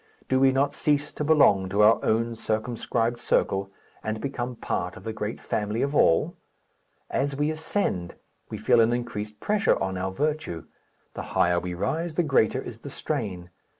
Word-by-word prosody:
Do 130 - +2
we 135 0 +5
not 140 +2 +1
cease 145 0 0
to - - -3
belong 140 -12 +4
to 100 +2 +3
our 110 +2 +5
own 115 +1 +1
circumscribed 115 +1 -1
circle, 100 -4 +1 0.3
and 110 0 -2
become 125 -1 -4
part - - -3
of 90 - -12
the 110 0 -4
great 110 0 -4
family 105 +2 -2
of 140 +1 -1
all? 80 - +3 0.8
As 140 +1 0
we 145 +2 +1
ascend 155 - -2 0.3
we - - -5
feel 115 - +4
an 115 +1 +3
increased 105 -3 -4
pressure 210 +1 +2
on 95 -1 -2
our 95 +1 -1
virtue. 150 - -2 0.5
The - - -5 0.2
higher 90 0 +4
we 90 0 -5
rise, 160 - -2
the 175 - +2
greater 130 -4 +2
is 115 -2 -8
the 140 - -8
strain. 100 - -4
115 Hz, 175 wpm, -26 LUFS, 105-145 Hz, 0.8 s, we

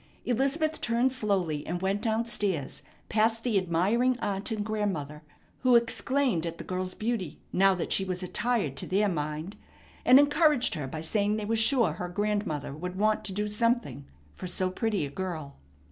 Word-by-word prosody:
Elizabeth 280 +6 0
turned 240 +2 +2
slowly, 190 - 0
and 175 +2 -2
went 195 +2 0
down 225 0 0
stairs, 200 - -2 0.3
past 225 +1 +2
the 240 -4 0
admiring 200 +9 +1
aunt 200 -3 -3
and 215 -2 -2
grandmother, 190 -9 -2 0.4
who 255 -2 +4
exclaimed 240 - +1
at 170 -1 -4
the - - -7
girl's 185 0 -3
beauty, 215 -8 -2 0.2
now 195 +1 +4
that 180 - -2
she 195 - +2
was 185 -1 -3
attired 210 - -1
to - - -4
their 205 +3 +2
mind, 155 +2 -3 0.5
and 255 - +8
encouraged 290 -2 +3
her 145 -3 -4
by 155 +4 -5
saying 205 +5 +1
they 210 - -3
were 225 +2 0
sure 225 - +3
her 180 +2 -5
grandmother 205 -7 -2
would 180 +5 -6
want 215 +1 +2
to - - -4
do 210 +2 -1
something 230 - 0 0.3
for 180 - -7
so 185 +1 -1
pretty 210 -4 -1
a 140 - -7
girl. 160 -5 -5
205 Hz, 175 wpm, -28 LUFS, 175-230 Hz, 0.5 s, and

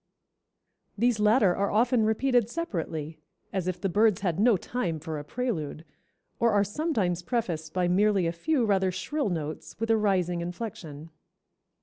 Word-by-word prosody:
These 235 0 +2
latter 210 -3 +4
are 200 0 0
often 230 +1 +3
repeated 245 0 +2
separately, 165 - -4 0.3
as 190 -2 -2
if 185 -1 -2
the 195 - -1
birds 205 +1 +3
had 180 -3 -1
no 220 -1 +5
time 175 -6 -3
for 155 0 -5
a - - -7
prelude, 160 - -3 0.5
or 235 0 +3
are 205 -1 +4
sometimes 205 - -1
prefaced 175 -8 -2
by 180 0 0
merely 195 +1 +3
a 165 - +1
few 255 - 0
rather 190 -3 +2
shrill 290 - -2
notes 155 -3 -5
with 225 0 0
a 225 - +4
rising 180 -5 +1
inflection." 170 -4 -7
195 Hz, 155 wpm, -27 LUFS, 170-225 Hz, 0.5 s, no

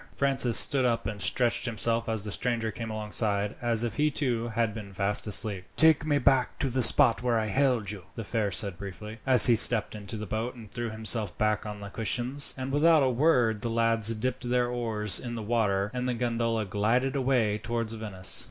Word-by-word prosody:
Francis 135 -4 +2
stood 135 -2 +5
up 120 -4 -1
and 105 0 -6
stretched 120 -1 0
himself 115 0 -1
as 110 -3 -1
the 105 - -4
stranger 115 +3 -2
came 115 +2 -7
alongside, 105 -1 -1
as 120 -1 +1
if 115 -2 -4
he 150 +1 +2
too 125 -5 -2
had 115 -1 -2
been 105 -2 -9
fast 100 +2 -1
asleep. 105 -2 0
"Take 160 -1 +4
me 145 -2 +1
back 130 -2 +1
to 135 - -2
the 130 +1 -1
spot 115 -1 +7
where 120 -2 0
I 110 -1 -2
hailed 125 -4 0
you," 100 -5 -10
the 115 - -6
fare 110 -1 -2
said 100 -2 -3
briefly, 105 +3 -9
as 130 -4 +8
he 120 - +4
stepped 110 -2 +3
into 105 0 -7
the 105 - -6
boat 110 +5 -4
and 110 -4 -13
threw 120 0 -5
himself 110 -2 -2
back 105 0 -1
on 105 -1 -8
the 100 - -8
cushions, 120 +6 0
and 130 +1 -5
without 155 +1 +3
a 130 - +1
word 120 -5 +1
the 120 - -3
lads 115 -1 +1
dipped 125 +2 -4
their 125 0 +1
oars 110 -5 -1
in 120 -1 -7
the 115 - -6
water 105 -3 -1
and 125 0 -3
the 125 - -2
gondola 115 -2 -2
glided 115 +7 -1
away 125 -6 0
towards 115 0 -4
Venice. 105 -5 +1
115 Hz, 210 wpm, -27 LUFS, 105-125 Hz, -, as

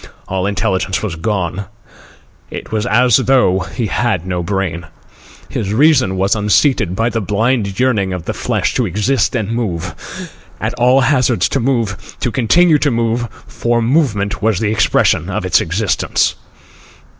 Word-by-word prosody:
All 95 0 -1
intelligence 95 -1 -1
was 100 -6 -3
gone. 95 0 -2 0.8
It - - -8
was 110 -1 -1
as 125 0 +4
though 125 -9 +3
he 115 +5 -4
had 105 -5 -1
no 90 -1 -2
brain. 85 -2 -3 0.6
His 100 -1 -3
reason 135 -9 +3
was 95 +1 +2
unseated 105 - +2
by 115 +3 +1
the 115 -1 -2
blind 105 0 0
yearning 110 -7 +1
of 90 -3 -5
the - - -2
flesh - - -1
to 125 - 0
exist 110 +5 0
and 110 -3 -2
move, 105 -9 -3 0.7
at - - -2
all 125 +3 +4
hazards 130 -3 +2
to - - 0
move, 115 -5 -2
to 120 - -1
continue 155 +7 +3
to 145 - +2
move, 115 0 0 0.2
for 120 0 -1
movement 115 -6 0
was 110 -3 +1
the 105 -2 0
expression 95 -5 +2
of 100 +1 -3
its 90 - +3
existence. 95 +5 0
110 Hz, 155 wpm, -16 LUFS, 95-120 Hz, 0.8 s, as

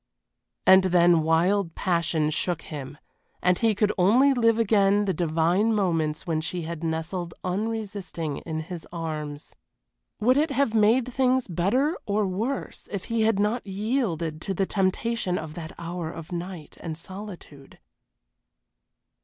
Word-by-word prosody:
And 190 0 +7
then 175 -2 +5
wild 165 +3 +2
passion 170 -4 +1
shook 170 +2 -1
him, 145 -2 -7 0.4
and 180 0 +2
he 225 -2 +2
could 210 +1 +2
only 245 +10 +5
live 230 -3 +3
again 205 -2 +3
the 190 - 0
divine 175 +6 +2
moments 165 -6 0
when 160 -3 0
she 175 +1 -3
had 165 0 -6
nestled 165 +2 -3
unresisting 195 -6 -3
in 160 -1 -4
his 170 0 -8
arms. 155 -3 -5 0.7
Would 250 +5 +3
it 305 +2 +2
have 280 -4 +1
made 230 +3 +3
things 255 0 +2
better 210 - +1
or 205 0 +1
worse 220 +9 -3
if 200 -3 -3
he 230 - +2
had 220 -2 +3
not 210 +3 0
yielded 190 - -1
to 195 - -2
the 195 - +1
temptation 195 0 0
of 155 -1 -6
that 160 -1 -7
hour 170 -1 -4
of 165 0 -9
night 175 -2 -6
and 160 -3 -5
solitude? 180 -6 -10
185 Hz, 145 wpm, -26 LUFS, 165-215 Hz, 0.7 s, And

